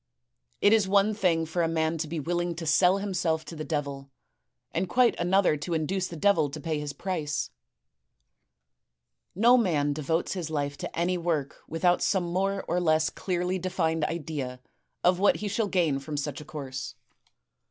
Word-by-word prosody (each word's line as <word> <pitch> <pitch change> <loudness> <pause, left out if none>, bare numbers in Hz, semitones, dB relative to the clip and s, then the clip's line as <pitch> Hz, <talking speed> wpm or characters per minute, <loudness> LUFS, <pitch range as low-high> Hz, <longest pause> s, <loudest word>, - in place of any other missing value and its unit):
It 205 - +6
is 215 -3 +4
one 200 +2 +3
thing 175 -6 +1
for 170 +2 -1
a 165 - +2
man 160 0 0
to 155 - -2
be 160 +1 -3
willing 175 +2 -1
to 165 0 -6
sell 180 +5 +4
himself 180 -5 -1
to 165 - -8
the 155 - -5
devil, 140 -3 -3 0.6
and 180 +2 -1
quite 250 +2 +4
another 180 -2 +3
to 165 +4 -3
induce 180 +4 -1
the 170 - -8
devil 200 -3 +3
to - - -7
pay 160 -2 -2
his 150 -1 -4
price. 155 - -3 0.9
" - - -54
No 245 +1 +8
man 150 -9 +1
devotes 160 +3 -1
his 175 -4 -4
life 145 -2 -2
to - - -6
any 180 +1 +1
work 160 -5 -1
without 175 +2 +2
some 190 -3 +2
more 195 +3 -1
or 175 +2 +1
less 160 -2 +2
clearly 180 0 -2
defined 165 -3 0
idea 150 -6 -4 0.4
of 180 0 +4
what 200 - +4
he 210 - -4
shall 210 +2 0
gain 165 -8 +1
from 145 +2 -5
such 145 +1 -3
a - - -11
course. 140 -3 -6
165 Hz, 180 wpm, -27 LUFS, 150-185 Hz, 0.9 s, No